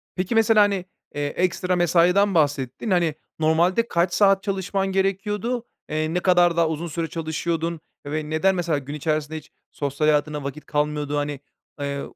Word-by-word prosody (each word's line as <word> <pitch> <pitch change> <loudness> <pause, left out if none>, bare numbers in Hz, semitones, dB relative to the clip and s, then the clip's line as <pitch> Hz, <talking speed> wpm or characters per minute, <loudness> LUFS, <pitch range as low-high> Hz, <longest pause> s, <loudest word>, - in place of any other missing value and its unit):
Peki 185 +5 -2
mesela, 225 -1 +5
hani, 200 -3 +2 0.3
eee, 145 0 -1
ekstra 180 +3 0
mesaiden 180 +3 +3
bahsettin. 145 - 0
Hani, 170 -4 +2 0.2
normalde 170 +8 +2
kaç 170 -2 +1
saat 195 -1 +4
çalışman 195 0 -1
gerekiyordu? 205 +5 -1 0.2
Eee, 155 +1 -1
ne 180 - +1
kadar 175 -2 +3
daha 165 -1 +3
uzun 160 +2 -3
süre 165 +1 -3
çalışıyordun? 165 +1 -3 0.3
Ve 150 +1 -3
neden 185 +5 +2
mesela 170 -4 0
gün 140 +1 -6
içerisinde 155 +1 -2
hiç 155 - -12 0.2
sosyal 145 +1 -1
hayatına 150 -1 +1
vakit 140 +2 -6
kalmıyordu? 150 0 -1
Hani, 145 -1 -2 0.4
eee, 140 0 -2
165 Hz, 160 wpm, -23 LUFS, 150-190 Hz, 0.4 s, mesela